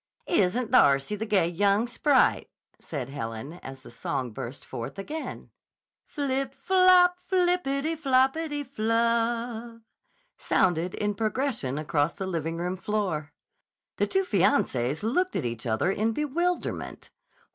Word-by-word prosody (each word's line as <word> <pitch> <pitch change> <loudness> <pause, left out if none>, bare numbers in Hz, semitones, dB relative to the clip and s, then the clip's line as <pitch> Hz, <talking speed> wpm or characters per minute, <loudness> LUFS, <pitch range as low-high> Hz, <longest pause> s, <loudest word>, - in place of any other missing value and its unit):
"Isn't 225 - +1
Darcy 140 +8 +4
the 220 +2 -4
gay 200 -6 +3
young 200 +5 +2
sprite!" 260 +3 +2 0.3
said 135 -5 -5
Helen 135 +4 -6
as 135 -1 -10
the - - -12
song 130 -4 -3
burst 130 +3 -6
forth 115 +9 -6
again. 300 +11 -6 0.6
"Flip 275 -2 -2
flop, 365 -1 +5
flippity 350 -5 0
floppity 290 +1 +1
flub" 230 -1 -1 0.6
sounded 175 0 +1
in 210 0 -1
progression 215 - -1
across 150 0 0
the 195 - -4
living 165 -2 -3
room 180 +2 -2
floor. 185 -8 -2 0.7
The - - +1
two 385 0 +1
fiancées 180 - +1
looked 360 +12 0
at - - -1
each 120 0 -4
other 110 +11 +1
in 220 +3 0
bewilderment. 335 +6 -2
215 Hz, 125 wpm, -27 LUFS, -, 0.7 s, flop